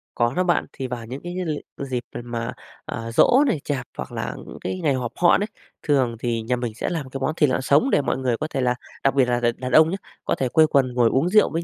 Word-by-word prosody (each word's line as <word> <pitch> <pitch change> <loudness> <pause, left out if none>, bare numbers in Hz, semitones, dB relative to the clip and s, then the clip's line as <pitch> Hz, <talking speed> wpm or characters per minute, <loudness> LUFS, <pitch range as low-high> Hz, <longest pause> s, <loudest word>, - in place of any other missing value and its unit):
Có 120 +1 +1
đó 180 - +1
bạn. 175 -1 +2
Thì 130 - -4
vào 120 -2 -5
những 130 +5 -7
cái 175 0 -5
lị 155 -3 -2 0.2
dịp, 130 -3 -3
ờ, - - -6
mà, 120 0 -4 0.3
à, 115 0 -5
giỗ 255 - +5
này, 220 - +1
chạp 135 -4 -2
hoặc - - -5
là 60 -1 -4
những - - -9
cái 185 - -3
ngày 155 -5 +2
họp 125 -3 -2
họ 175 - +5
đấy. 205 - -1 0.4
Thường 130 -6 +2
thì 115 -1 -1
nhà 120 +3 0
mình 120 -2 -3
sẽ - - -2
làm 155 -6 -3
cái 135 - -5
món 145 - +1
thịt 150 -4 +3
lợn 130 - 0
sống 140 - +3
để 145 - +3
mọi 130 -2 -1
người 125 -3 0
có 155 - -3
thể 140 -4 -2
là 125 -1 +2 0.3
đặc 135 0 +2
biệt 135 -2 +5
là 120 0 +1
đ 120 - -1
đàn 130 0 -4
ông 155 +4 +6
nhá 190 - -2 0.3
có - - +1
thể 130 - -1
quây 155 +4 +5
quần 135 -4 +2
ngồi 120 -2 +4
uống 135 +9 +1
rượu 210 +3 +5
với 165 +1 -2
130 Hz, 285 wpm, -23 LUFS, 120-155 Hz, 0.4 s, ông